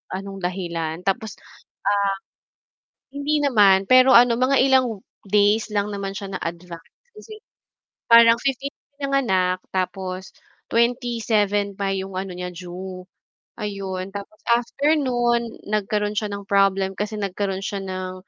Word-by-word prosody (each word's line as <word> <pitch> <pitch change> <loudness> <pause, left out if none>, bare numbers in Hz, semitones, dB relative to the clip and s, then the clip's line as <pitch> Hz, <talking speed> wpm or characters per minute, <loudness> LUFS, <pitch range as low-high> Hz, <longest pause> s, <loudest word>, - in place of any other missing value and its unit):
anong 195 0 -7
dahilan 170 -3 -3
tapos, 210 +2 -1
ah - - -19 1.5
hindi 285 +2 -1
naman 200 -8 +4
pero 255 +1 +7
ano, 235 -1 +6
mga 255 +2 +3
ilang 255 -6 +2 0.2
days 210 +2 +2
lang 205 0 0
naman 200 -1 -4
siya 195 0 -6
na-advance. 170 -1 -6 1.2
Parang 230 0 +7
15 275 +1 -2 0.2
pinanganak 195 -11 +1
tapos 185 0 -4 0.4
27 225 -4 +1
pa 195 -1 -1
'yong 190 -1 -4
ano, 190 -1 -4
niya 180 0 -5
due. 180 +1 -8 0.6
Ayon 195 -2 -4
tapos 200 +2 -9
after 260 +6 +2
no'n, 240 -4 +1 0.2
nagkaroon 210 0 -1
siya 210 -1 -1
ng 200 0 -8
problem 195 -1 +2
kasi 210 +1 -3
nagkaroon 195 0 -2
siya 195 0 -4
ng, 185 -1 -5
200 Hz, 120 wpm, -22 LUFS, 190-235 Hz, 1.5 s, pero